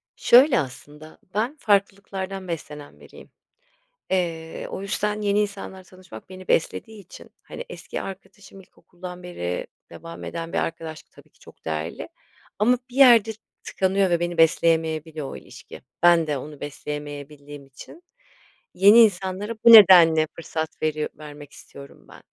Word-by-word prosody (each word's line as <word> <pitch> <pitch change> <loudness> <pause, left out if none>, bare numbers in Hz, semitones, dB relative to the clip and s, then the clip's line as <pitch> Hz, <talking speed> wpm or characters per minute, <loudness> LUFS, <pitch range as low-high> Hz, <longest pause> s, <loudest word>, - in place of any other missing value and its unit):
Şöyle 255 +2 +5
aslında, 150 +3 -9 0.2
ben 230 +8 -2
farklılıklardan 195 -2 -2
beslenen 150 -3 -8
biriyim. - - -16 0.8
Eee, 165 -3 -3
o - - -6
yüzden 210 +1 -2
yeni 205 0 +1
insanlarla 195 -2 -5
tanışmak 185 -11 -14
beni 185 0 -12
beslediği 220 +6 -1
için, 185 - -15
hani - - -9
eski - - -7
arkadaşım 195 0 -11
ilkokuldan 180 -1 -12
beri 90 - -5 0.2
devam 165 0 -10
eden 165 0 -6
bir - - -1
arkadaşlık, 160 -1 -6
tabii - - -20
ki, - - -32
çok - - -19
değerli, 80 +1 -5 0.5
ama 240 +4 +3
bir 245 - -12
yerde 240 -5 +6 0.3
tıkanıyor 190 0 0
ve 170 - +1
beni 175 0 -3
besleyemeyebiliyor 160 -2 +1
o - - -8
ilişki. - - -13 0.2
Ben 170 -2 +5
de 145 -2 -2
onu 145 +2 -10
besleyemeyebildiğim 145 0 -8
için 135 - -15 0.7
yeni 205 +4 +6
insanlara 200 0 +1
bu 235 - +9
nedenle 170 -7 +8
fırsat 160 -1 -5
veri 155 -1 -1
vermek 145 -1 -12
istiyorum 140 0 -15
ben - - -16
175 Hz, 135 wpm, -23 LUFS, 155-200 Hz, 0.8 s, bu